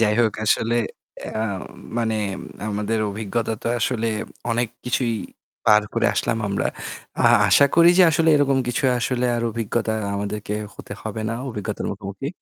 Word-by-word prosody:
যাই 105 -2 +3
হোক 110 -3 +2
আসলে 115 +2 +2 0.5
আ 110 - -3 0.6
মানে 115 -1 0 0.5
আমাদের 105 +2 -1
অভিজ্ঞতা 110 +2 -2
তো - - -5
আসলে 115 0 0 0.4
অনেক 120 0 +1 0.2
কিছুই 125 -1 0 0.5
পার 105 0 +6
করে - - +2
আসলাম 115 - 0
আমরা। 100 - 0 0.5
আ - - +3 0.3
আশা 140 - +7
করি 170 0 +7
যে - - +9
আসলে 165 +1 +2
এরকম 140 -2 +3
কিছু 125 +3 -1
আসলে 125 +1 0
আর 115 - -1
অভিজ্ঞতা 115 0 -1 0.2
আমাদেরকে 105 +1 -3 0.2
হতে - - -9
হবে 110 0 -4
না, 115 - -2
অভিজ্ঞতার 105 -3 -4
মুখোমুখি। 100 +6 -5
115 Hz, 150 wpm, -23 LUFS, 105-120 Hz, 0.6 s, যে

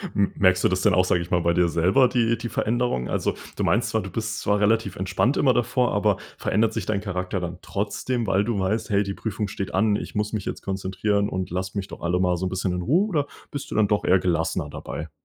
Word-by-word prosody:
M 100 -2 +2
merkst 95 -1 +4
du - - +6
das 95 0 0
denn - - +4
auch, 90 +1 +4
sage 90 -1 +2
ich 85 - -7
mal 90 - +3
bei 85 0 +2
dir 90 0 +3
selber 95 +11 +4
die 115 -1 +1
die 115 +1 -5
Veränderung? 115 - 0
Also, - - 0 0.2
du - - -2
meinst 115 +2 +2
zwar, 110 0 0
du 95 - -7
bist 110 +3 -3
zwar 105 0 +1
relativ 105 -2 +2
entspannt, 95 +8 0
immer 130 -3 +4
davor, 120 +1 +1
aber 105 -1 +2 0.2
verändert 110 +1 +1
sich 110 -5 -3
dein 100 -2 -1
Charakter 95 -1 -3
dann 90 0 -5
trotzdem, 110 +4 -2
weil 95 +1 +2
du 115 -2 -1
weißt: 105 +4 -1
„Hey, 100 -1 +3
die 100 0 -4
Prüfung 105 0 -3
steht 100 0 -5
an, 105 +2 +3
ich - - -5
muss 105 +1 -1
mich 105 -3 -2
jetzt - - -4
konzentrieren 100 +2 -1
und 95 0 -3
lasst 95 +2 -3
mich 100 -1 -2
doch - - -10
alle 85 +1 0
mal 90 -1 +2
so 95 - -2
'n - - -1
bisschen 95 0 -1
in 90 - -2
Ruhe.“ 165 - +2
Oder 145 -6 0 0.2
bist 140 -1 -6
du - - -3
dann 110 -2 +4
doch 105 +1 +1
eher 95 - +5
gelassener 80 -3 -1
dabei? 80 +2 -6
100 Hz, 255 wpm, -24 LUFS, 90-110 Hz, 0.2 s, du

